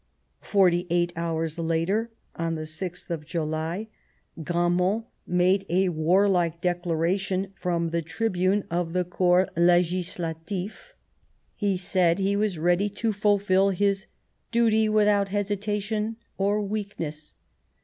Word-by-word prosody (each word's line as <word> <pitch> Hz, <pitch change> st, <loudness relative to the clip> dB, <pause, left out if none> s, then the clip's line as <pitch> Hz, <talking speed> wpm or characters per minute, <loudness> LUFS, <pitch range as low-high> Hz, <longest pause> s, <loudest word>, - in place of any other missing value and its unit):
Forty 180 Hz, -3 st, +2 dB
eight 175 Hz, 0 st, +1 dB
hours 165 Hz, -1 st, -2 dB
later, 165 Hz, +8 st, 0 dB, 0.3 s
on 165 Hz, 0 st, -2 dB
the 155 Hz, -, -4 dB
6th 175 Hz, +3 st, -6 dB
of 160 Hz, -3 st, -3 dB
July, 160 Hz, +5 st, -3 dB, 0.5 s
Gramont 175 Hz, +6 st, +1 dB, 0.2 s
made 180 Hz, +2 st, +3 dB
a 185 Hz, +2 st, +2 dB
warlike 175 Hz, +1 st, +2 dB
declaration 180 Hz, +2 st, -1 dB
from 170 Hz, -2 st, -1 dB
the 170 Hz, 0 st, 0 dB
tribune 190 Hz, +2 st, 0 dB
of 170 Hz, -1 st, -1 dB
the 180 Hz, 0 st, +1 dB
Corps 180 Hz, +1 st, +3 dB
Legislatif; 175 Hz, -, 0 dB, 0.6 s
he 200 Hz, -3 st, 0 dB
said 180 Hz, -2 st, +2 dB
he 195 Hz, +1 st, +1 dB
was 205 Hz, -3 st, 0 dB
ready 175 Hz, +5 st, +2 dB
to 220 Hz, +2 st, -2 dB
fulfil 200 Hz, -1 st, +3 dB
his 195 Hz, +2 st, 0 dB, 0.2 s
" -, -, -46 dB
duty 220 Hz, -2 st, +3 dB
without 210 Hz, -2 st, +3 dB
hesitation 210 Hz, +2 st, -2 dB, 0.2 s
or 205 Hz, +2 st, +1 dB
weakness." 195 Hz, -7 st, -5 dB
180 Hz, 120 wpm, -26 LUFS, 170-200 Hz, 0.6 s, made